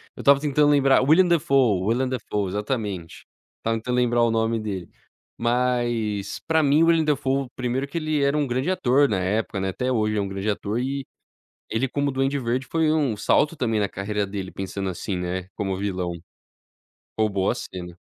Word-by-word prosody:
Eu - - -8
estava 140 0 +6
tentando 145 0 +2
lembrar 135 -2 +4
Willem 160 +7 +5
Defoe, 135 - +3
Willem 125 +3 +1
Defoe! 105 -6 -2
Exatamente. 105 -5 -4 0.3
Estava 115 0 -1
tentando 125 +3 -2
lembrar 120 -1 +2
o 115 - +3
nome 115 0 +1
dele. 100 -5 -5 0.5
Mas 120 -4 0
pra 160 -1 +3
mim 145 +3 +4
Willem 165 -1 +4
Defoe 135 -2 0
primeiro 130 +2 -2
que 155 - -5
ele 155 -3 0
era 140 +2 +2
um 145 -2 +1
grande 130 +7 -1
ator 140 -5 +3
na 100 -3 0
época, 100 +2 -1
né, 95 0 -1
até 125 +7 -2
hoje 105 -2 +1
é - - +2
um 100 - -2
grande 95 +2 -3
ator 105 +2 -2
e 135 +2 -2 0.7
ele 120 +4 0
como 140 +1 0
Duende 135 +1 0
Verde 125 +1 -1
foi 160 -2 +1
um 145 -8 +1
salto 150 +9 +2
também 115 -5 0
na 100 - 0
carreira 105 +1 -2
dele, 95 -1 -5
pensando 95 0 -4
assim, 95 +1 -4
né, 90 +1 -3
como 95 -3 -2
vilão. 95 -3 -2 1.1
Roubou 100 -3 +1
a - - 0
cena. 90 -1 -8
120 Hz, 185 wpm, -24 LUFS, 100-140 Hz, 1.1 s, estava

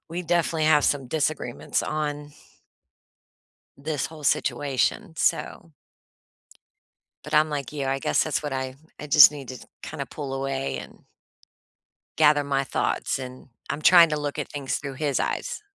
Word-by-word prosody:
we 170 +2 -4
definitely 170 -2 0
have 150 -2 +4
some 135 -3 +1
disagreements 150 -3 -2
on 150 -1 -3 1.4
this 145 +1 -3
whole 155 -1 -12
situation, 145 +2 0
so 165 - -1 1.5
But 150 0 -6
I'm 155 +1 +5
like 145 -2 -4
you, 140 -2 -3
I 135 0 0
guess - - +1
that's 155 -1 -1
what 145 - -4
I 130 -1 -3 0.2
I 150 - -7
just 145 0 +9
need 140 -4 -9
to 130 -2 -9 0.2
kinda - - -6
pull 135 -2 -6
away 135 0 -3
and - - -11 1.1
gather 150 -2 +4
my 135 -1 0
thoughts, 135 - -1
and 130 0 -9 0.2
I'm 150 - -4
trying 170 0 +8
to 150 -1 -1
look 145 0 -4
at 150 - -3
things 140 -2 -3
through 140 -2 -6
his 140 0 -1
eyes. 485 -4 -3
145 Hz, 150 wpm, -25 LUFS, 135-155 Hz, 1.5 s, just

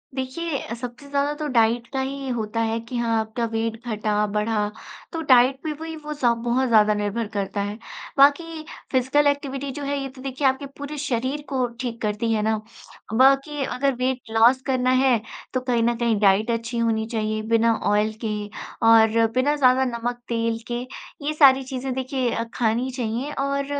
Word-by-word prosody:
देखिए 275 +4 -3
अ, - - -6
सबसे 240 +3 -8
ज़्यादा 285 +1 0
तो 305 - -2
डाइट 230 +1 +3
का 265 - -1
ही 270 0 -4
होता 225 0 -3
है 225 0 0
कि 230 +2 -6
हाँ, 230 -1 +1
आपका 220 +2 -2
वेट 225 0 -2
घटा, 210 -1 0
बढ़ा, 210 0 0 0.4
तो 330 - -3
डाइट 260 -2 +5
पे 315 - -2
वही 320 0 -5
वो 300 -1 -6
सब 240 -5 +1
बहुत 255 +2 +2
ज़्यादा 215 -2 +5
निर्भर 210 +2 -2
करता 200 0 -2
है। 205 +1 -4 0.4
बाकी 310 +3 +3 0.3
फ़िज़िकल 265 +3 +3
एक्टिविटी 280 -1 -1
जो 285 +2 -6
है, 280 0 -1
ये 270 - -4
तो 260 0 -13
देखिए 270 +1 -1
आपके 265 +2 0
पूरे 285 +1 -6
शरीर 275 0 -2
को 260 -2 +1 0.2
ठीक 235 -2 -4
करती 215 +2 -1
है 215 - +1
ना। 220 0 +1 0.6
बाकी 275 +4 +3
अगर 275 +1 0
वेट 255 +1 -1
लॉस 235 +4 +5
करना 255 -1 +1
है, 250 -5 +3 0.3
तो 255 - +1
कहीं 245 -2 +1
न 235 +1 +2
कहीं 230 -3 +1
डाइट 205 +3 +3
अच्छी 230 +1 -3
होनी 225 -1 +1
चाहिए, 215 -2 -2
बिना 230 +1 +2 0.2
ऑयल 210 +1 +2
के 215 -1 -1 0.5
और 225 0 +6
बिना 285 +4 +2
ज़्यादा 260 -2 +4
नमक, 240 0 -3
तेल 230 -1 -1
के। 240 0 -1 0.4
ये 305 - 0
सारी 270 -3 +6
चीज़ें 260 0 -4
देखिए 260 -2 -1
अ, 230 - -1
खानी 235 +2 0
चाहिए 245 +4 -2
और 280 0 0
245 Hz, 185 wpm, -23 LUFS, 225-275 Hz, 0.6 s, और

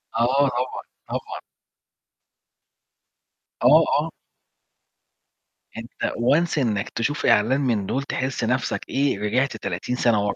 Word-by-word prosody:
آه، 130 +5 +3
طبعًا 125 +1 -3 0.3
طبعًا. - - -5 2.2
آه، - - +7 0.2
آه. - - -2 1.7
أنت 115 +1 -4
once 155 +8 +2
إنك 110 -7 0
تشوف 140 +6 -2
إعلان 125 +7 +3
من 115 -7 0
دول 135 +7 -2
تحس 130 -2 -3
نفسك 125 +2 0
إيه، 135 -6 0
رجعت 125 +7 0
30 100 +6 -3
سنة 115 -5 +2
ورا، 100 - -1
125 Hz, 110 wpm, -23 LUFS, 110-135 Hz, 2.2 s, آه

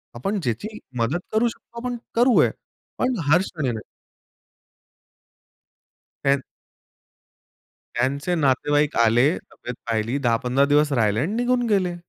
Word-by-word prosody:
आपण 195 - -2
ज्याची 205 - -3 0.2
मदत 130 +10 +1
करू 220 +2 +3
शकतो 235 0 -8
आपण 245 -1 -3 0.2
करू 245 +1 +4
आहे - - +3 0.5
पण 255 -2 +1
हर 170 +5 +6
क्षणी 155 -9 -2
नाही. 110 -2 -5 2.4
त्यां 140 0 +3 1.6
त्यांचे 140 +8 0
नातेवाईक 145 0 +2
आले, 115 +4 +4 0.2
तब्येत 125 - -7
पाहिली, 115 +3 0
10-15 125 +2 +2
दिवस 145 +1 +3
राहिले 110 -4 +2
आणि 160 - -1
निघून 245 0 +1
गेले. 185 -4 +1
145 Hz, 120 wpm, -23 LUFS, 120-205 Hz, 2.4 s, हर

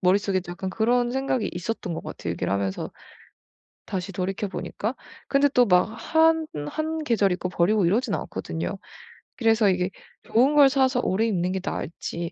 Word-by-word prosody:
머릿속에 190 +1 +2
약간 185 +2 -4
그런 240 +3 +2
생각이 260 -4 0
있었던 180 0 -4
것 - - -5
같아요, 85 - -6
얘기를 - - -3
하면서 100 -1 -2 1.0
다시 190 0 -4
돌이켜보니까. 195 +4 -3 0.3
근데 280 +1 +4
또 250 -2 +4
막 180 -1 +5
한 320 +8 +2 0.2
한 315 - -3
계절 210 -8 +2
입고 180 0 -2
버리고 185 +2 +2
이러진 215 +4 +1
않거든요. 165 +5 -4 0.6
그래서 225 -3 +4
이게 180 0 +1 0.3
좋은 260 +6 +3
걸 285 -2 +8
사서 260 -2 +2
오래 205 +4 +1
입는 185 -5 0
게 190 - -1
나을지 170 +1 -4
205 Hz, 340 characters per minute, -25 LUFS, 180-250 Hz, 1.0 s, 걸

